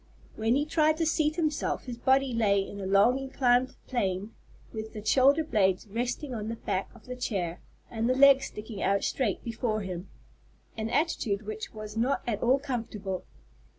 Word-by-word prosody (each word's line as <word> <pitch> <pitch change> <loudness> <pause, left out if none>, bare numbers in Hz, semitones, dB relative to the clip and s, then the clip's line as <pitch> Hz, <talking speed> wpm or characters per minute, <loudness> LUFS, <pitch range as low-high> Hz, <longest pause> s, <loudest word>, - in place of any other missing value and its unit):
When 225 +2 +1
he 290 +2 +1
tried 310 0 +2
to 325 - +1
seat 310 -1 +1
himself 310 -4 -1
his 240 -2 -6
body 265 0 +3
lay 210 -3 +3
in 200 - -8
a 190 - -3
long 200 +7 +4
inclined 260 -1 +1
plane, 205 -4 -2 0.4
with 220 -1 -6
the 210 -1 -8
shoulder 275 +6 +5
blades 195 - +1
resting 245 +6 -3
on 215 -2 -4
the 230 - -3
back 190 -3 -3
of 225 - -17
the 250 - -6
chair, 185 -8 -3 0.3
and 230 +1 -1
the 255 - +3
legs 275 0 +7
sticking 210 -1 -8
out 200 0 +2
straight 230 -8 -1
before 225 -2 -2
him, 185 -1 -6 0.7
an 220 0 -3
attitude 235 -9 0
which 215 +1 -5
was 215 0 -8
not 250 +5 +1
at 215 -3 -2
all 255 +3 +4
comfortable. 225 -8 -4
230 Hz, 180 wpm, -28 LUFS, 210-265 Hz, 0.7 s, legs